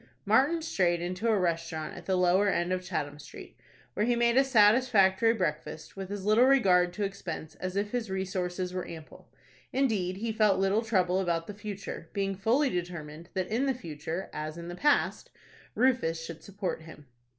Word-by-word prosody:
Martin 275 +11 +3
strayed 175 - +1
into 180 +6 -3
a 220 -2 +3
restaurant 165 -3 -2
at - - -11
the 190 - +2
lower 185 +3 +3
end 175 -1 0
of 185 - -1
Chatham 150 -5 -4
Street, - - -11 0.4
where 210 - 0
he 240 +2 +2
made 235 0 +2
a 270 - +6
satisfactory 225 -3 +4
breakfast, 160 -6 -3
with 195 -1 -6
as 200 -1 -5
little 215 +4 +5
regard 185 -10 +4
to 205 +3 -4
expense 175 -5 -5
as 185 0 -4
if 205 +1 -1
his 240 -4 -2
resources 185 -1 -3
were 185 -1 -4
ample. 160 -2 -11 0.4
Indeed, 210 -9 0
he 225 +2 -2
felt 215 -3 +3
little 195 +3 +2
trouble 190 -5 +1
about 170 -3 0
the 210 - -7
future, 200 -5 -7
being 195 -1 -1
fully 240 +9 +2
determined 170 -2 -5
that 185 -1 -1
in 240 +6 0
the 265 - +1
future, 165 -3 -6
as 155 +1 -5
in 170 0 -7
the 175 - -6
past, 295 +9 +1 0.5
Rufus 220 -11 +1
should 165 -1 -9
support 195 -4 -4
him. 160 -2 -13
190 Hz, 185 wpm, -29 LUFS, 175-220 Hz, 0.5 s, a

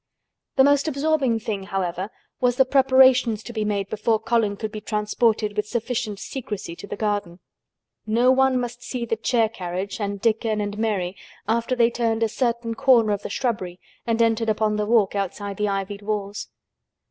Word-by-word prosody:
The 265 - +6
most 285 +2 +3
absorbing 280 -4 +1
thing, 210 -4 -4
however, 190 -1 -2 0.3
was 245 -1 +2
the 265 - +4
preparations 260 -4 +4
to 240 - -8
be 215 -2 -1
made 200 -2 -1
before 215 +2 +1
Colin 220 -2 0
could 215 +1 -4
be 215 - -6
transported 210 0 0
with 210 0 -1
sufficient 235 -2 -2
secrecy 205 -6 -6
to 200 - -9
the - - -5
garden. 205 -4 -2 0.7
No 235 +4 +4
one 265 -1 +3
must 245 0 -5
see 250 -1 -4
the 225 - 0
chair 225 +1 +2
carriage 190 0 -5
and 200 -1 -3
Dickon 220 0 +1
and 205 0 -3
Mary 200 -5 -1 0.3
after 235 +3 0
they 235 -1 +3
turned 230 -1 0
a 225 - +1
certain 235 -1 -1
corner 230 -2 +4
of 205 -1 -1
the - - -6
shrubbery 200 -7 -2 0.3
and 230 0 +2
entered 225 0 +1
upon 215 0 +1
the 210 0 -1
walk 220 -4 +3
outside 200 0 -3
the 210 0 0
ivied 200 +1 -3
walls. 205 0 -3
220 Hz, 180 wpm, -23 LUFS, 205-240 Hz, 0.7 s, The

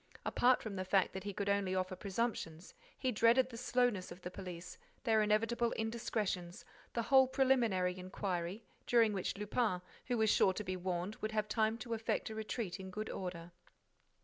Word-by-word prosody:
Apart 250 +1 +3
from 205 -3 -5
the 185 - -1
fact 190 0 +2
that 190 0 -6
he 205 - -2
could 200 +1 -3
only 200 -2 +1
offer 185 0 -1
presumptions, 190 -4 -3 0.2
he 255 - 0
dreaded 240 +3 +4
the - - -8
slowness 245 -5 +1
of 175 - -9
the 180 - -5
police, 180 -2 -8 0.2
their 220 -4 +4
inevitable 225 +3 +2
indiscretions, 215 -5 -2 0.3
the 235 - 0
whole 265 +2 +6
preliminary 240 -9 +2
inquiry, 185 +1 -3 0.2
during 230 -3 +4
which 195 0 -2
Lupin, 210 -1 0 0.3
who 245 -1 +1
was 220 -1 +4
sure 190 - +4
to 210 - -4
be 185 -1 -3
warned, 185 +2 -3
would 215 +1 -3
have 215 -1 0
time 220 +1 +1
to 235 0 -5
effect 225 0 -1
a - - -4
retreat 215 -3 -3
in 190 0 -7
good 215 +3 -4
order. 175 -2 -5
210 Hz, 180 wpm, -35 LUFS, 185-230 Hz, 0.3 s, whole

